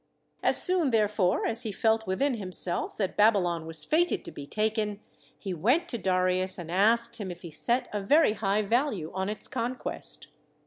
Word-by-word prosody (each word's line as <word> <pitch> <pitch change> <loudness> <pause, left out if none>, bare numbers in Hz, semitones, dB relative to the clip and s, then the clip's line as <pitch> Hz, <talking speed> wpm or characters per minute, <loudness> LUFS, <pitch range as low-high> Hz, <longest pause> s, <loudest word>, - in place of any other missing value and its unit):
As - - +7
soon 360 -6 +6
therefore 210 -5 +1
as 230 +1 0
he 225 -4 -4
felt 220 +1 0
within 260 +9 0
himself 185 -4 -2
that 195 -3 -2
Babylon 180 -6 +2
was 160 -2 0
fated 345 +3 0
to - - -7
be 140 - -10
taken, 215 0 -2 0.4
he 195 -3 -6
went 250 - +1
to 235 - -4
Darius 185 0 0
and 170 -2 -8
asked 230 +5 +2
him 205 -5 -6
if 175 0 -10
he 170 - -9
set 245 - 0
a 205 - -2
very 285 +4 +3
high 205 0 -1
value 215 - -1
on 190 +1 -3
its 210 - -4
con 245 0 -3
quest. - - -3
210 Hz, 185 wpm, -27 LUFS, 185-235 Hz, 0.4 s, As